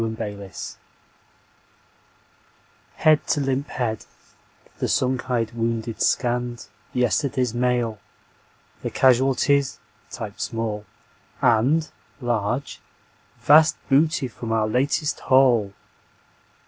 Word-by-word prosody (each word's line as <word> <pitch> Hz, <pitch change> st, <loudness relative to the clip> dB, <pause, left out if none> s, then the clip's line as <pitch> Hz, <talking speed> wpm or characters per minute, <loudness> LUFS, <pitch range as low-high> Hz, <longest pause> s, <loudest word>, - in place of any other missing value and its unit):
Smile, 110 Hz, 0 st, -2 dB
Smile, 105 Hz, -2 st, -4 dB, 0.2 s
Smile -, -, -7 dB, 2.2 s
Head 155 Hz, -1 st, +3 dB
to 150 Hz, -, +1 dB
limp 135 Hz, 0 st, -1 dB
head, 115 Hz, -5 st, -3 dB, 0.7 s
the -, -, 0 dB
sunk 130 Hz, 0 st, 0 dB
eyed 115 Hz, -3 st, 0 dB
wounded 115 Hz, -1 st, -3 dB
scanned 120 Hz, -1 st, 0 dB, 0.3 s
Yesterday's 125 Hz, 0 st, 0 dB
Mail; 120 Hz, -3 st, 0 dB, 0.8 s
the -, -, -3 dB
casualties 135 Hz, +2 st, +3 dB, 0.3 s
(typed -, -, -7 dB
small) 110 Hz, -2 st, -3 dB, 0.5 s
And 130 Hz, +7 st, +2 dB, 0.3 s
(large) 120 Hz, +1 st, -2 dB, 0.6 s
Vast 155 Hz, +2 st, +6 dB
Booty 145 Hz, 0 st, +3 dB
from 115 Hz, -1 st, -7 dB
our 110 Hz, -1 st, +1 dB
Latest 140 Hz, +6 st, 0 dB
Haul. 125 Hz, -6 st, +3 dB
125 Hz, 95 wpm, -23 LUFS, 115-135 Hz, 2.2 s, Vast